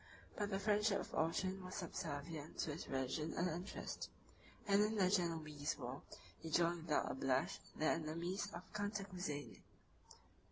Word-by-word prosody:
But 205 -1 0
the 195 - +1
friendship 210 +1 +4
of - - -5
Orchan 185 +4 +1
was 185 0 -5
subservient 155 -4 -3
to 155 - 0
his 160 - -5
religion 135 +4 0
and 180 - +3
interest; 180 +3 -3 0.6
and 200 0 +6
in 215 +1 +2
the 185 -3 +4
Genoese 160 -6 +1
war 130 +1 -4 0.4
he 165 - -5
joined 170 0 +3
without 150 - +3
a - - -2
blush 130 0 +2 0.2
the 155 - 0
enemies 170 +6 +1
of 175 -1 -6
Cantacuzene. 195 -8 -2
170 Hz, 150 wpm, -41 LUFS, 155-195 Hz, 0.6 s, and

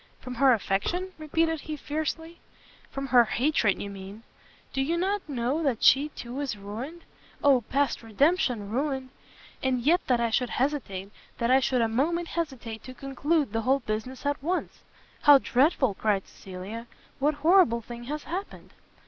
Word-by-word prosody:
"From 255 - -7
her 270 -1 +7
affection?" 250 - 0
repeated 320 0 0
he, 310 -1 -5
fiercely, 320 +3 -4 0.5
"from 275 0 -4
her 245 -1 +7
hatred 235 -3 +1
you 200 - -5
mean! 195 +3 -10 0.5
do 270 - 0
you 325 +5 0
not 390 +3 0
know 260 +3 -1
that 270 -8 0
she, 285 +3 +6
too, 250 -2 -7
is 270 -7 -3
ruined? 235 +12 -7 0.4
Oh 275 -3 +5
past 275 +4 0
redemption 235 - +1
ruined! 265 +1 -1 0.5
and 260 -1 +1
yet 335 +9 +3
that 250 -2 +3
I 235 -1 0
should 250 +1 +1
hesitate, 235 -9 -2 0.3
that 235 0 +1
I 260 - +6
should 255 -2 +1
a - - +2
moment 330 +9 0
hesitate 260 -9 -4
to 255 - -9
conclude 275 0 -1
the 225 - 0
whole 265 +4 +2
business 230 +5 -4
at 285 -1 0
once!" 350 +6 -2 0.4
"How 290 -1 +9
dreadful!" 260 - +2
cried 200 -1 0
Cecilia, 195 +5 -8 0.3
"what 295 +2 +2
horrible 310 -7 +4
thing 240 +1 -9
has 295 +3 -4
happened?" 370 +5 -6
265 Hz, 165 wpm, -27 LUFS, 230-305 Hz, 0.5 s, How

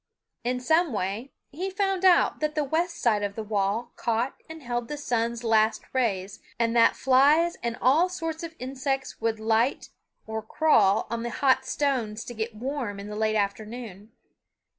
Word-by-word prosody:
In 250 +1 -1
some 320 +3 +2
way 205 +6 -3 0.2
he 360 +7 -3
found 385 -1 -1
out 370 -2 +4
that 305 0 -1
the 305 - +1
west 335 +5 -1
side 215 -4 +2
of 200 -1 -3
the 220 - -4
wall 210 +3 -1
caught 235 +3 0 0.2
and 320 -2 -9
held 240 -1 -3
the 295 - -5
sun's 235 -4 -1
last 220 -1 +2
rays, 205 -7 -1 0.2
and 230 0 +1
that 230 - +5
flies 290 +6 +4
and 235 0 -3
all 310 +8 +4
sorts 325 -3 -4
of 330 -1 -7
insects 265 0 -3
would 225 -1 0
light 225 +4 +1 0.4
or 220 0 -4
crawl 220 -4 +3
on 235 0 -2
the 235 - -3
hot 260 +1 +2
stones 235 -7 -1
to 240 - -7
get 220 0 -4
warm 240 -3 -4
in 200 +1 -7
the 210 - -6
late 215 0 0
afternoon. 215 0 -4
240 Hz, 175 wpm, -26 LUFS, 220-285 Hz, 0.4 s, that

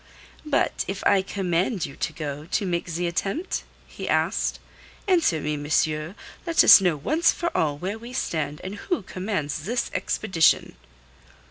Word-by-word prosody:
"But 295 - +1
if 195 0 -5
I 195 - +5
command 185 0 -1
you 140 - -9
to - - -2
go 150 -1 -6
to 200 - -1
make 175 -1 -2
the 175 +2 -2
attempt?" 195 - -2 0.2
he - - -7
asked. - - 0 0.5
"Answer 335 - +3
me, 150 0 -2
monsieur, 155 +3 0 0.3
let 335 - +5
us - - +10
know 175 -5 +2
once 310 - +2
for 340 - -3
all 145 -2 +1
where 195 +7 -4
we 235 +2 -10
stand, 155 - -2
and 190 - -5 0.2
who 355 - 0
commands 185 -7 -3
this 235 +4 -1
expedition." 190 -7 +1
180 Hz, 155 wpm, -25 LUFS, 155-215 Hz, 0.5 s, us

